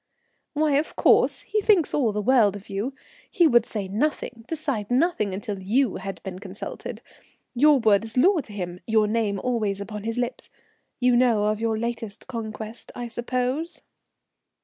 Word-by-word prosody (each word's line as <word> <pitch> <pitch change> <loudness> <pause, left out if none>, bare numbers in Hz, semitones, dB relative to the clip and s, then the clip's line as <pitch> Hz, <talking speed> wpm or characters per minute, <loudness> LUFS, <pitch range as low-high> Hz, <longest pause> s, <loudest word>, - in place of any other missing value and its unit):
"Why, 300 -2 +2
of 300 - -2
course, - - +4
he 425 - -1
thinks 395 -6 +3
all 250 -7 +2
the 210 0 -2
world 220 -5 +4
of 200 0 -10
you. 215 +8 -3 0.3
He 350 - +3
would 240 -6 +4
say 205 -3 -3
nothing, 230 +1 -2
decide 280 -10 -3
nothing 250 - +1
until 200 +1 -4
you 230 +4 +1
had 195 0 -7
been 185 -2 -6
consulted. 195 0 -7 0.5
Your 290 +4 +5
word 215 -4 +3
is 225 +2 -6
law 360 +7 +5
to 250 - -7
him, 180 -3 -5
your 220 -1 +3
name 210 -2 0
always 215 -5 0
on 210 +1 -6
his 230 +1 -3
lips. 245 0 -3 0.5
You 250 -1 +4
know 240 -4 +3
of 215 +1 0
your 225 -1 0
latest 230 -2 -4
conquest, 220 -2 -7
I 245 - -4
suppose?" 255 +7 -2
230 Hz, 170 wpm, -25 LUFS, 210-260 Hz, 0.5 s, Your